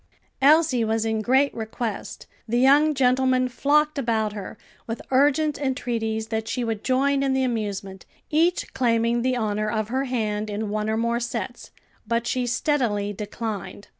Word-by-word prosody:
Elsie 290 -3 +5
was 220 0 0
in 220 -1 0
great 265 +5 +3
request; 220 -1 -5 0.2
the 235 +2 0
young 290 +4 +5
gentlemen 255 -1 +3
flocked 295 +4 +1
about 220 -4 0
her, 205 +1 -7 0.3
with 225 0 -4
urgent 290 +3 +3
entreaties 230 -5 -2
that 220 -1 -2
she 250 - -2
would 225 -2 -3
join 275 +2 +2
in 270 -1 +1
the 265 0 +1
amusement, 205 -6 -3 0.2
each 335 +4 +1
claiming 235 -2 +1
the 255 +1 +1
honor 215 -2 -1
of 215 -1 -2
her 265 +3 -1
hand 215 -4 -2
in 210 +1 -3
one 215 0 -1
or 220 - 0
more 235 +1 0
sets, 240 0 -5 0.4
but 235 +1 0
she 250 0 -1
steadily 230 -5 0
declined. 210 -1 -6
235 Hz, 160 wpm, -24 LUFS, 220-265 Hz, 0.4 s, Elsie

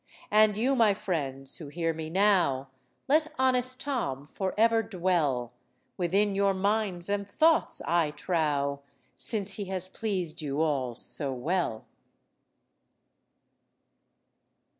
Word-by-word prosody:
And 215 -1 +5
you, 260 +5 +2
my 220 -5 +4
friends, 140 -9 -3
who 155 - -9
hear 165 +2 -2
me 160 0 -6
now, 175 -8 +2 0.4
Let 310 +2 +2
honest 255 0 +1
Tom 145 - -3
for 190 +5 -4
ever 225 +1 +4
dwell 170 - 0 0.4
Within 195 +3 +1
your 195 0 +2
minds 195 -2 0
and 200 0 -2
thoughts, 320 +8 +2
I 170 -2 +2
trow, 150 -3 -1 0.4
Since 205 -3 +1
he 205 - -3
has 185 -1 -2
pleased 185 -7 -3
you 145 -1 -3
all 135 -6 0
so 140 +3 -2
well." 130 -2 -2
185 Hz, 120 wpm, -28 LUFS, 150-210 Hz, 0.4 s, And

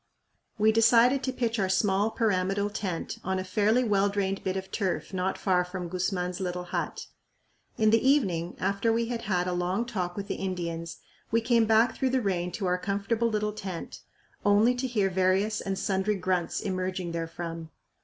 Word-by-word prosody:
We 215 +1 +4
decided 230 +4 +5
to 260 - -1
pitch 235 -3 -1
our 190 -1 +1
small 195 +2 +2
pyramidal 200 -2 0
tent 190 -5 -4
on 190 0 -1
a 185 - -2
fairly 210 +6 +2
well 200 -3 +2
drained 195 -1 -2
bit 190 0 -1
of 190 0 -6
turf 195 -1 -2
not 185 +1 -1
far 180 -2 +2
from 180 -1 -6
Guzman's 180 0 -2
little 180 -1 -3
hut. 175 - -4 0.7
In 215 -1 +4
the 225 - +4
evening, 190 - +2
after 200 +4 +1
we 230 +1 0
had 235 -2 -3
had 180 -5 0
a 180 - -1
long 180 +6 0
talk 185 -6 -3
with 200 -1 -4
the - - -2
Indians, 170 -3 -4 0.3
we 230 - +3
came 230 0 +3
back 225 +2 +4
through 265 - 0
the 260 +1 +2
rain 180 -4 -1
to 195 - -3
our 180 0 +1
comfortable 205 +4 0
little 210 -1 -1
tent, 190 -5 -6 0.4
only 205 +4 +4
to 250 +1 -2
hear 215 -6 +1
various 190 +3 +1
and 195 -1 -3
sundry 195 +2 0
grunts 185 -2 -1
emerging 185 -2 -2
therefrom. 165 0 -5
195 Hz, 185 wpm, -28 LUFS, 180-220 Hz, 0.7 s, decided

